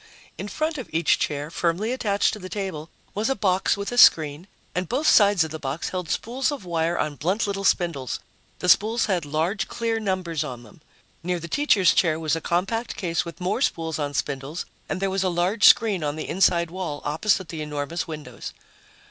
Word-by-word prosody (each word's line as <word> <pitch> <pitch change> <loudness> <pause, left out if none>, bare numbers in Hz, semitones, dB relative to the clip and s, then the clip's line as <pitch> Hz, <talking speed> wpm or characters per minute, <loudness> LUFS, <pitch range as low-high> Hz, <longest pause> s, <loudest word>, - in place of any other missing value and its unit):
In 200 - -6
front 310 +6 -2
of 255 - -7
each 160 0 +2
chair, 145 +1 -2
firmly 180 +8 0
attached 205 -6 +1
to 215 - -6
the 185 -1 -8
table, 185 -6 -5 0.2
was 215 +5 -1
a 270 - +1
box 190 -2 +1
with 200 +2 -4
a 245 - +1
screen, 155 -1 +5 0.3
and 180 -1 -2
both 275 +5 -1
sides 205 -5 +6
of 160 - -5
the 160 - -6
box 140 +3 -3
held 180 -4 -4
spools 255 - -1
of 275 -9 -6
wire 170 0 0
on 150 -2 -2
blunt 190 +8 0
little 200 -1 -3
spindles. 165 -10 0 0.4
The 180 - -4
spools 220 +6 +4
had 180 -6 0
large, 170 +8 -1
clear 230 -1 -2
numbers 185 -7 -2
on 125 -5 -7
them. 110 +6 -17 0.4
Near 180 +1 -2
the 170 - -7
teacher's 195 - +3
chair 160 -3 +2
was 160 -1 0
a 165 - -4
compact 195 +7 -1
case 170 -2 -1
with 170 +2 -9
more 185 +7 -1
spools 165 - -1
on 145 -1 -3
spindles, 140 +4 -3 0.2
and 190 - -2
there 195 0 0
was 195 0 0
a 185 - +1
large 180 +5 +1
screen 205 -7 +5
on 145 0 -1
the 155 - -5
inside 170 -2 +2
wall, 175 -5 -5
opposite 175 +5 0
the 160 -2 -5
enormous 150 +2 -3
windows. 155 -2 -8
180 Hz, 205 wpm, -24 LUFS, 160-200 Hz, 0.4 s, sides